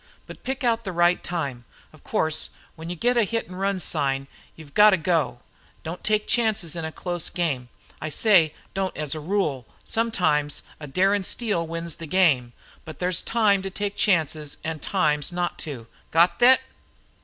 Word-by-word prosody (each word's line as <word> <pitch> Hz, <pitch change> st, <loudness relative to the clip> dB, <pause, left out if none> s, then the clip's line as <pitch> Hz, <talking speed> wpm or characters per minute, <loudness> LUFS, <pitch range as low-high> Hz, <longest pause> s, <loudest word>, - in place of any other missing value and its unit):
But -, -, -11 dB
pick 265 Hz, +2 st, -3 dB
out 230 Hz, -1 st, +2 dB
the 195 Hz, -, -4 dB
right 175 Hz, 0 st, +2 dB
time. 140 Hz, -9 st, -3 dB, 0.3 s
Of -, -, -18 dB
course 155 Hz, 0 st, 0 dB, 0.3 s
when 160 Hz, +1 st, -8 dB
you 175 Hz, -, -3 dB
get 245 Hz, +8 st, +2 dB
the 235 Hz, -2 st, +3 dB
hit 230 Hz, +3 st, -2 dB
an' 180 Hz, -, -10 dB
run 195 Hz, 0 st, -1 dB
sign 135 Hz, -5 st, 0 dB, 0.3 s
you 160 Hz, -, -12 dB
've 140 Hz, -, -19 dB
got 210 Hz, 0 st, +8 dB
to 190 Hz, -, +4 dB
go. 155 Hz, -7 st, 0 dB, 0.4 s
Don't 165 Hz, +2 st, -6 dB
take 215 Hz, 0 st, +1 dB
chances 215 Hz, -8 st, +1 dB
in 165 Hz, -, -4 dB
a 160 Hz, -, -3 dB
close 175 Hz, 0 st, -3 dB
game. 140 Hz, -8 st, -2 dB, 0.3 s
I 155 Hz, -, -3 dB
say, 165 Hz, -3 st, +4 dB, 0.2 s
don't 190 Hz, -1 st, -2 dB
as 150 Hz, -2 st, -2 dB
a 155 Hz, -, -4 dB
rule. 150 Hz, -, -1 dB, 0.2 s
Sometimes 160 Hz, -10 st, 0 dB, 0.2 s
a 150 Hz, -, -7 dB
darin' 195 Hz, +7 st, +2 dB
steal 195 Hz, -5 st, -1 dB
wins 165 Hz, -1 st, -4 dB
a 165 Hz, -, -5 dB
game. 145 Hz, -9 st, +3 dB, 0.3 s
But 155 Hz, -3 st, -9 dB
there's 180 Hz, -1 st, +1 dB
time 210 Hz, -4 st, +2 dB
to 195 Hz, -, -4 dB
take 205 Hz, +1 st, -3 dB
chances 155 Hz, -6 st, +1 dB
an' 160 Hz, -1 st, -3 dB
times 150 Hz, -6 st, 0 dB
not 175 Hz, 0 st, -2 dB
to. 125 Hz, -6 st, -7 dB, 0.2 s
Got 170 Hz, +2 st, +3 dB
thet?" 255 Hz, +2 st, +7 dB
175 Hz, 185 wpm, -24 LUFS, 155-200 Hz, 0.4 s, got